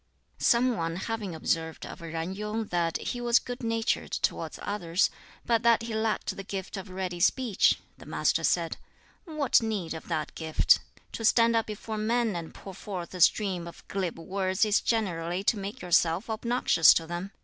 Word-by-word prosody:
Some 245 +1 +3
one 165 -1 -2
having 205 -2 -4
observed 160 0 -2
of - - -9
Yen 165 +2 -4
Yung 210 +2 -3
that 170 -2 0
he 245 - -4
was 240 0 +4
good 245 0 -4
natured 225 -1 -1
towards - - -2
others, 180 -3 0 0.3
but 230 -2 +2
that 235 -1 +4
he 230 -1 -5
lacked 220 0 -1
the 195 - -6
gift 195 +1 -5
of 195 0 -7
ready 185 -1 -4
speech, 225 +3 +3 0.2
the - - -13
Master - - +1
said, - - +1 0.5
"What 305 -7 +2
need 210 -7 -2
of 160 - -8
that 160 -3 -2
gift? 160 -1 +3 0.3
To 225 - -6
stand 230 +1 +4
up 225 - +1
before 215 0 -5
men 225 -1 +1
and 170 -2 -5
pour 195 - -10
forth 185 -2 -6
a 180 - -5
stream 185 -2 +3
of 170 - -12
glib 190 -4 -2
words 190 +3 0
is 210 -1 +3
generally 180 -5 -1
to 225 - +3
make 200 +1 -6
yourself 175 +4 +2
obnoxious 235 -6 +4
to 165 - 0
them. 175 +3 -5
195 Hz, 180 wpm, -28 LUFS, 175-225 Hz, 0.5 s, was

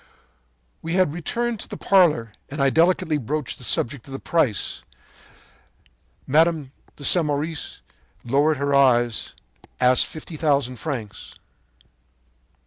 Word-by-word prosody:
“When 165 - -4
we - - +1
had 185 -6 +2
returned 230 +7 -3
to - - -8
the - - -8
parlor 150 - +3 0.2
I 135 -1 +1
delicately 165 -2 +2
broached 145 +3 -4
the - - -9
subject 125 +1 -1
of 135 - -10
the 135 - -5
price. 135 - 0 1.4
Mme. 155 -1 +2 0.3
Samoris, 150 +1 +1 0.4
lowering 145 +5 +2
her 140 +1 -1
eyes, 120 -4 +2 0.4
asked 125 0 +4
fifty 155 0 -9
thousand 140 -5 0
francs. 120 -8 -6
145 Hz, 115 wpm, -23 LUFS, 130-160 Hz, 1.4 s, asked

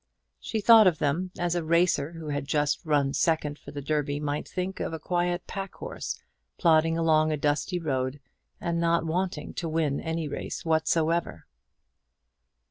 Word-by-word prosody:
She 220 - -3
thought 220 -1 +8
of 170 -3 +3
them 160 +7 0
as 175 -1 0
a 175 -1 -1
racer, 170 -2 +2
who 165 -2 -7
had 145 -1 -3
just 150 -1 0
run 145 -4 +1
second 150 -2 0
for - - -12
the 145 -1 -6
Derby, 145 -1 -1
might 150 0 -3
think 185 +1 -4
of - - -3
a 160 - -4
quiet 175 +1 -1
pack 195 -1 -6
horse - - -5 0.4
plodding 165 -1 +3
along 155 -1 +3
a 155 - 0
dusty 150 +5 0
road 135 -4 -2 0.4
and 170 -1 -1
not 170 0 +2
wanting 180 +4 -2
to 170 - -3
win 155 -3 0
any 160 -1 -3
race 145 - -5
whatsoever. 160 - +1
160 Hz, 165 wpm, -27 LUFS, 150-175 Hz, 0.4 s, thought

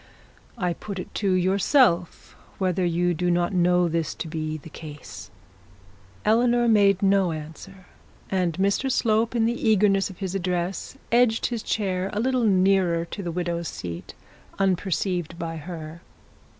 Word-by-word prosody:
I 180 -5 0
put 200 +3 -7
it 180 - -7
to 200 -2 0
yourself 185 - +2 0.2
whether 185 -1 0
you 175 0 +1
do 175 +2 -1
not 175 +1 +1
know 180 0 +3
this 165 -1 -2
to - - -5
be 155 -1 -3
the 155 - -12
case.' 145 - -10 1.0
Eleanor 240 +2 +3
made 200 -3 +4
no 195 -2 +3
answer, 165 +5 -9 0.4
and 180 -3 0
Mr 200 - 0
Slope, 225 -1 +1
in 225 -1 +3
the 235 -1 0
eagerness 200 -2 +3
of 190 - -11
his 190 -2 -4
address, 180 +5 -3
edged 235 -1 +3
his 235 -3 -2
chair 190 -4 -1
a 210 - -1
little 255 0 +1
nearer 185 -4 +3
to 200 - -7
the 175 -3 -4
widow's 170 -1 -2
seat, 85 -1 -7 0.4
unperceived 185 -2 -1
by 165 -1 -4
her. 160 0 -8
185 Hz, 150 wpm, -25 LUFS, 170-205 Hz, 1.0 s, made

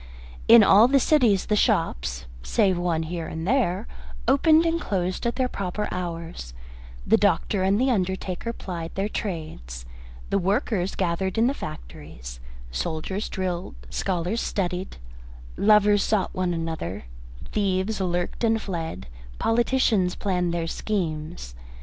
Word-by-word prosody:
In 230 -1 +9
all 205 +4 +7
the 275 +1 +4
cities 240 -9 +3
the 210 - +1
shops, 60 - 0 0.2
save 180 - +2
one 175 -2 0
here 165 0 -4
and 160 +2 -5
there, 220 -5 +1 0.4
opened 310 +5 +5
and 335 +1 +1
closed 185 +3 -1
at 235 - -1
their 260 -1 +1
proper 200 -2 -3
hours, 165 - -5 0.5
the - - +5
doctor - - +1
and 195 +2 +2
the 260 +1 +3
undertaker 190 0 -2
plied 170 -7 -6
their 195 +1 0
trades, 155 - -5 0.5
the 200 - +3
workers 195 0 0
gathered 185 +1 -1
in 225 - +4
the 265 - +2
factories, - - -9 0.3
soldiers 160 - -3
drilled, 180 - -3 0.2
scholars 185 - -1
studied, 185 -1 -2 0.6
lovers 210 -1 +5
sought 210 -2 0
one 185 -1 0
another, 160 - -4 0.5
thieves 195 +1 0
lurked 175 +3 -2
and 225 -1 +3
fled, 165 - -5 0.3
politicians 225 -5 +2
planned 180 -3 0
their 170 -1 -1
schemes. 165 - -3
185 Hz, 130 wpm, -25 LUFS, 165-215 Hz, 0.6 s, In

